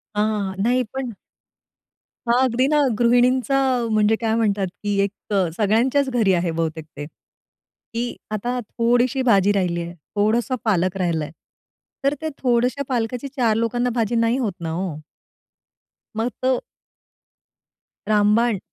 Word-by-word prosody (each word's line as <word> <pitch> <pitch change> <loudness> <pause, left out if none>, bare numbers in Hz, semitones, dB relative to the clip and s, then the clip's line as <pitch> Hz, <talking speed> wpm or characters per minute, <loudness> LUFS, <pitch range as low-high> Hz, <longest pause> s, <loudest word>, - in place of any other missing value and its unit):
हां, 210 +1 +2 0.2
हां. 190 0 -5
नाही 250 +3 +2
पण 265 -2 -3 1.2
हां. 235 +1 +3
अगदी 255 0 +2
ना 300 +1 +3 0.2
गृहिणींचा 245 +3 +3 0.3
म्हणजे 215 0 +3
काय 225 -1 +1
म्हणतात, 205 -4 +1 0.2
की 205 -1 0
एक 200 - -1 0.5
सगळ्यांच्याच 245 +7 +2
घरी 225 -6 +2
आहे 175 -1 0
बहुतेक 160 -1 -3
ते. 145 - -5
की 230 +8 -9 0.2
आता 240 +4 -2
थोडीशी 245 +3 +1
भाजी 205 -6 +4
राहिली 180 -4 0
आहे 170 0 -6 0.2
थोडसा 225 +5 +1
पालक 185 -3 +1
राहिलंय. 165 -5 -1 0.7
तर 275 +1 +2
ते 315 - -2
थोडशा 250 +2 +1
पालकाची 245 +1 -2
4 230 -4 +2
लोकांना 240 +2 0
भाजी 230 -1 0
नाही 230 +1 +2
होत 235 -7 -1
ना 165 - -3
हो. 170 -2 -3 1.2
मग 225 +3 -1
तो 255 -1 +2 1.5
रामबाण. 210 +1 +3
230 Hz, 130 wpm, -22 LUFS, 200-245 Hz, 1.5 s, भाजी